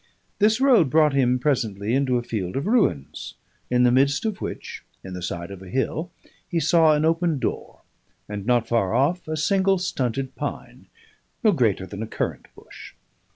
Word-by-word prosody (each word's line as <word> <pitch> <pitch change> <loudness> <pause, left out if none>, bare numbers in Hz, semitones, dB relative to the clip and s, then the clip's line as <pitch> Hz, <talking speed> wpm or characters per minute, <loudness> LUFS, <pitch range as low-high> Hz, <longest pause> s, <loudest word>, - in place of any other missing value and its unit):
This 215 +2 +3
road 250 - +5
brought 155 +1 +4
him 125 -2 +2
presently 115 -6 -1
into 130 -2 +2
a 120 - -2
field 100 -7 -4
of 135 - -2
ruins, 200 - 0 0.3
in 125 0 +3
the 125 - +5
midst 140 - +2
of 215 -3 -3
which, - - -6 0.2
in 95 - -8
the 90 - -6
side 85 0 -5
of 95 -1 -9
a 95 - -11
hill, 145 - -2 0.4
he 170 - 0
saw 160 0 +4
an 150 +1 +1
open 165 -1 +1
door, 125 - -4 0.5
and, 105 -1 -5
not 120 0 +1
far 115 -3 +1
off, 155 +8 +1
a 155 0 -3
single 195 +4 +2
stunted 135 -7 -2
pine - - -7 0.6
no 215 - +5
greater 110 - +1
than 100 +2 -8
a 110 - -4
currant - - -4
bush. - - -13
135 Hz, 180 wpm, -23 LUFS, 110-165 Hz, 0.6 s, road